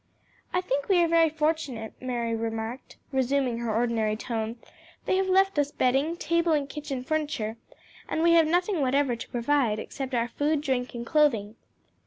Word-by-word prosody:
"I 360 - +1
think 285 -3 -2
we 380 - +5
are - - +3
very 330 -1 +4
fortunate," 300 -7 -2
Mary 240 -2 -2
remarked, 225 +2 -5
resuming 265 -2 +1
her 235 -1 -2
ordinary 225 -1 +1
tone; 225 0 -3 0.5
"they - - +2
have 380 0 +1
left 385 -3 +3
us 290 -1 +2
bedding, 275 +7 +1
table 335 -1 +1
and 290 -2 +1
kitchen 280 -3 -5
furniture, 290 -7 -2 0.5
and 320 - 0
we 340 - +5
have 330 -2 +6
nothing 355 +1 +1
whatever 270 -1 +2
to 230 - -8
provide 240 -2 +1
except 265 +3 -5
our 235 0 +1
food, 290 +4 0
drink 260 -4 -2
and 235 0 -5
clothing." 235 -9 +2
270 Hz, 170 wpm, -27 LUFS, 235-315 Hz, 0.5 s, have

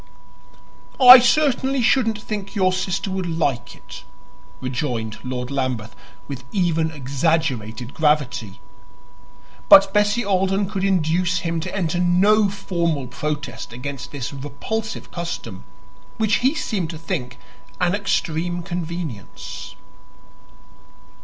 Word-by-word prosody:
"I 255 0 +12
certainly 265 0 +2
shouldn't 225 -3 +2
think 205 -1 -6
your 185 -2 +2
sister 190 +1 -2
would 190 -1 -2
like 150 -7 -1
it," - - -12 0.6
rejoined 125 -4 -3
Lord 125 0 -4
Lambeth 130 -5 -3 0.3
with 135 -3 -7
even 165 -5 +1
exaggerated 135 -5 -2
gravity. 145 -9 0 1.1
But 195 0 +8
Bessie 210 +3 +2
Alden 195 0 +1
could 190 - -2
induce 175 -2 +1
him 165 -1 -2
to 160 - -5
enter 175 -3 -1
no 195 +4 +4
formal 170 -7 -2
protest 140 0 -5
against 130 +2 -6
this 140 -2 -5
repulsive 145 +11 -5
custom, 120 - -6 0.5
which 220 -2 +2
he 265 +5 +1
seemed 195 - -2
to 165 - -6
think 125 -6 -4 0.4
an 180 -1 +2
extreme 175 -3 -1
convenience. 170 - -6
170 Hz, 110 wpm, -21 LUFS, 140-195 Hz, 1.1 s, I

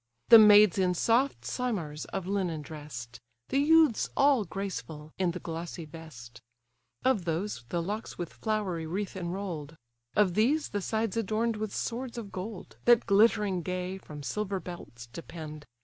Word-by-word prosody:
The 230 - +11
maids 210 -2 +7
in 180 -1 +2
soft 245 +9 +2
simars 180 -12 -3
of 195 -2 -4
linen 180 -6 -1
dress'd; 140 -6 -8 0.3
The 275 - +2
youths 310 -4 +4
all 275 -6 +4
graceful 165 -5 -6
in 185 -2 +2
the 175 +1 -4
glossy 165 0 -6
vest: 130 -7 -11 0.6
Of 245 -9 +2
those 165 - -2
the 170 -1 -1
locks 210 +5 -5
with 175 -2 -5
flowery 195 -7 -2
wreath 190 +4 -3
inroll'd; 175 -4 -5 0.4
Of 205 -4 +4
these 270 - +2
the 205 - -2
sides 220 +1 -1
adorn'd 225 +1 0
with 215 -1 -3
swords 240 +1 -3
of 210 -4 -6
gold, 190 +1 -7
That 240 -1 +6
glittering 205 -2 +3
gay, 185 +2 -3
from 150 -5 -10
silver 200 +4 -2
belts 160 -10 -9
depend. 155 +3 -9
190 Hz, 150 wpm, -29 LUFS, 165-215 Hz, 0.6 s, The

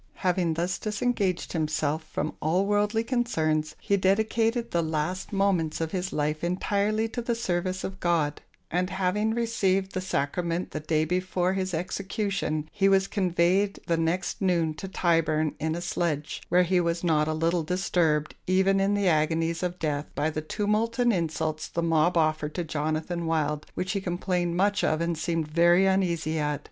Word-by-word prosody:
Having 175 -3 +2
thus 175 +3 -1
disengaged 210 -4 -1
himself 155 -1 -1
from 155 - -3
all 175 +5 +2
worldly 210 +2 +1
concerns, 160 - 0
he 200 - +1
dedicated 220 +4 +1
the 170 - +2
last 160 +4 -2
moments 195 -6 +1
of 165 -1 -2
his 185 -1 -2
life 150 +1 -1
entirely 205 +5 0
to 240 - -4
the 235 0 -1
service 185 -4 -2
of 190 0 -5
God; 160 -5 0 0.3
and 180 +2 0
having, 195 +4 0
received 195 -5 +1
the 185 - -3
Sacrament 170 +2 -2
the - - -3
day 155 0 0
before 180 +1 0
his 190 -1 -2
execution, 190 -3 -2
he 195 0 +2
was 195 0 +4
conveyed 190 +1 +1
the 170 - +1
next 165 +3 -1
noon 170 -4 +2
to 155 +5 -7
Tyburn 165 -4 +1
in 160 +1 -1
a 170 - -4
sledge, 155 -4 -2
where 180 +1 +5
he 180 0 +2
was 170 0 -1
not 155 -3 +2
a 155 - 0
little 165 +2 +1
disturbed, 160 -3 0
even 190 +1 +3
in 195 +1 +2
the 200 -1 +1
agonies 165 +1 +1
of 180 -1 -2
death, 150 -3 -2
by 155 +2 0
the 155 - -3
tumult 215 +7 -1
and 240 -2 +3
insults 160 -3 -2
the 170 - -2
mob 165 +1 +2
offered 155 -1 +1
to 175 - -1
Jonathan 155 +2 -2
Wild, 150 -2 -1
which 185 - -2
he 200 -2 -1
complained 175 -1 -1
much 200 +2 +2
of 155 - +2
and 170 0 0
seemed 165 -1 -1
very 175 +4 +4
uneasy 170 -5 +1
at. 150 -1 -1
175 Hz, 175 wpm, -27 LUFS, 160-195 Hz, 0.3 s, where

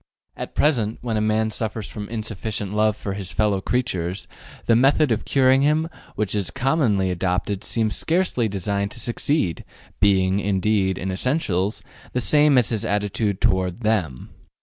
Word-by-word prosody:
At - - -7
present, 120 -8 +2
when 115 -3 -2
a 105 - +1
man 110 +1 +1
suffers 110 -1 -3
from 105 -1 -7
insufficient 110 -2 -4
love 105 0 +2
for 100 - -4
his 95 -3 -5
fellow 105 -3 +1
creatures, 95 -7 -2 0.4
the 115 - +4
method 135 +3 +4
of 115 - 0
curing 130 0 +4
him 155 +3 +2 0.3
which 105 -2 -1
is 100 -4 -1
commonly 120 - +1
adopted 90 +3 -1
seems 110 -2 0
scarcely 165 -9 +1
designed 100 0 -2
to - - -7
succeed, 120 - 0 0.4
being, 95 -1 +3
indeed, 95 -1 +1
in 95 +1 -3
essentials, 100 - -1 0.3
the 125 - +1
same 145 +2 +4
as 120 -3 +3
his 110 -2 -1
attitude 105 -1 -1
toward 95 +1 0
them. 95 - -1
105 Hz, 155 wpm, -22 LUFS, 95-120 Hz, 0.4 s, the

